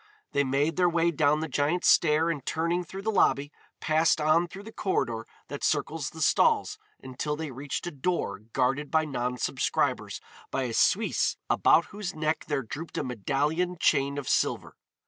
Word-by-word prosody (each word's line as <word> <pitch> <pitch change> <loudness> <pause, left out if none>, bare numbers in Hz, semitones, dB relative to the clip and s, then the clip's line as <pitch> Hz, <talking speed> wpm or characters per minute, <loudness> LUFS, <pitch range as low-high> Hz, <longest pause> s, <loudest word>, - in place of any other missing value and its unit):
They 140 - +2
made 140 +4 0
their 180 -1 +4
way 170 0 +2
down 150 0 +2
the 160 - -2
giant 150 +5 0
stair 160 +1 +4
and 145 -5 -5
turning 170 +4 -1
through 190 +3 -8
the 220 - 0
lobby 145 -7 +2 0.3
passed 155 +1 +2
on 155 +3 +3
through 195 +3 -10
the 225 - -10
corridor 115 - -2 0.2
that 145 +1 -7
circles 150 0 0
the 160 -1 -4
stalls - - +2 0.2
until 130 +3 -3
they 155 -2 -5
reached 135 +5 -5
a 175 - -4
door 170 - -2
guarded 130 +6 -1
from 155 -2 +1
non 125 -1 -2
subscribers - - -1 0.3
by 135 - -1
a 120 -2 -3
Suisse - - +2
about 165 - +4
whose 205 -3 -5
neck 155 0 -1
there 145 -3 -1
drooped 155 +8 -7
a - - -1
medallioned 145 - -1
chain 140 -1 +2
of 140 -2 -5
silver. - - 0
150 Hz, 175 wpm, -27 LUFS, 135-170 Hz, 0.3 s, their